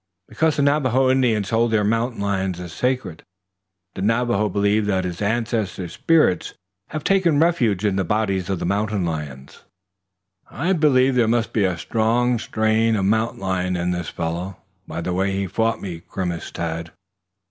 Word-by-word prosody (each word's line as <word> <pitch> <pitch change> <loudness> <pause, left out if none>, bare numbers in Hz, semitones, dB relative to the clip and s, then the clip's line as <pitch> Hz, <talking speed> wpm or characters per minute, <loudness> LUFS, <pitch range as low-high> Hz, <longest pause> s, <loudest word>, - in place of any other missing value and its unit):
"Because 160 -2 +1
the 145 - +1
Navajo 135 -3 +3
Indians 115 -6 +1
hold 115 +1 +2
the 110 -2 +2
mountain 115 +3 0
lion 95 -2 -1
as 90 -1 -8
sacred. 125 -10 -2 0.7
The - - -6
Navajo 115 0 +1
believes 100 +2 +1
that 95 -2 +1
his 90 +1 -5
ancestors' 105 -5 -2
spirits 160 - +2 0.3
have 155 -1 -5
taken 180 -7 +3
refuge 120 - +2
in 100 -2 +1
the 95 - +1
bodies 100 -1 -1
of 95 - 0
the - - -4
mountain 100 0 0
lions." 75 -5 -6 0.9
"I 165 +9 -1
believe 135 -6 +3
there 120 -3 +3
must 115 0 0
be 105 -3 +2
a 90 -2 -1
strong 115 +6 +1
strain 110 +1 +1
of 100 -2 0
mountain 110 +1 0
lion 90 -1 -1
in 90 0 -1
this 90 -2 -3
fellow, 85 +3 -4 0.3
by - - -5
the 90 +1 -2
way 95 +2 0
he 100 0 -1
fought 110 +4 -1
me," 85 -4 -6
grimaced 90 -3 -4
Tad. 85 0 -3
105 Hz, 170 wpm, -22 LUFS, 90-120 Hz, 0.9 s, Navajo